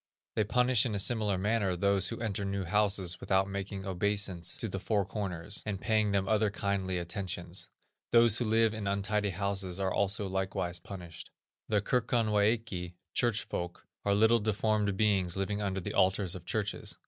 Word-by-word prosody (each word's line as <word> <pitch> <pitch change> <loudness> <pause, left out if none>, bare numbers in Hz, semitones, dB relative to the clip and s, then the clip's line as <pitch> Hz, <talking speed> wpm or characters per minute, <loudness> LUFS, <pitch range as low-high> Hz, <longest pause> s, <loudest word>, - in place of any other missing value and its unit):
They 110 - +3
punish 125 +1 +3
in 115 -5 -1
a - - 0
similar 105 -1 +1
manner 100 -1 +1
those 100 +2 +2
who 115 - -5
enter 105 -3 -2
new 100 0 -2
houses 95 -1 +1
without 95 0 +2
making 100 0 -5
obeisance 95 -2 -1
to 115 - -2
the 95 -1 -4
four 100 0 0
corners, 95 -1 -3
and 100 -3 -3
paying 110 -1 +2
them 100 -1 +1
other 110 0 +3
kindly 95 -2 -1
attentions; 90 0 -4 0.4
those 115 -2 +5
who 120 - 0
live 110 0 +3
in 110 -2 -4
untidy 100 +1 0
houses 95 -1 -2
are 95 -1 0
also 100 0 0
likewise 95 -2 -2
punished. 90 -4 -9 0.4
The 105 -2 +2
Kirkonwæki 110 -6 +1 0.2
(church 120 -3 +1
folk) 85 0 -5 0.2
are 100 0 +2
little 110 +3 +5
deformed 105 -1 0
beings 95 -4 +2
living 100 +2 -1
under 95 -1 -1
the 90 - -5
altars 95 -1 +2
of 90 -3 -7
churches. 105 -2 -2
100 Hz, 170 wpm, -31 LUFS, 95-110 Hz, 0.4 s, those